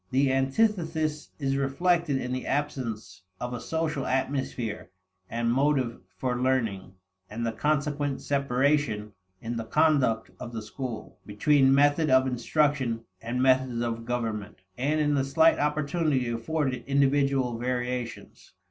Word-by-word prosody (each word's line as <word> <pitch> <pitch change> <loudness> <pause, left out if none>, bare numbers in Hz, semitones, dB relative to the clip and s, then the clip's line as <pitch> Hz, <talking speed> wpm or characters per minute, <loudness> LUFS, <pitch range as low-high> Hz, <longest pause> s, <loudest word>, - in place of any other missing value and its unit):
The 135 +1 +2
antithesis 155 +1 0
is 135 -2 -1
reflected 150 +2 +1
in 125 -1 -3
the 130 - -4
absence 115 -10 -3 0.2
of 125 0 -4
a 120 - -5
social 160 -4 -2
atmosphere 130 -5 -2 0.4
and 115 +1 0
motive 135 -3 +1 0.2
for 125 +4 -1
learning, 115 -8 0 0.4
and 115 +3 -4
the 115 - 0
consequent 145 +3 -1
separation, 140 -5 +1 0.3
in 115 +1 -4
the 115 - -2
conduct 130 -3 +2
of 120 - -7
the 110 -1 -4
school, 120 +1 -7
between 135 +6 +3
method 145 +2 +3
of 130 0 +5
instruction 130 -1 0 0.2
and 120 +3 -1
methods 130 -2 +3
of 115 -1 -3
government; 110 -5 -3
and 145 +5 0
in 150 -1 +2
the 140 -2 +2
slight 160 +4 +4
opportunity 150 -2 0
afforded 130 +1 -2
individual 135 -3 +2
variations. 125 -1 -4
130 Hz, 130 wpm, -27 LUFS, 120-145 Hz, 0.4 s, of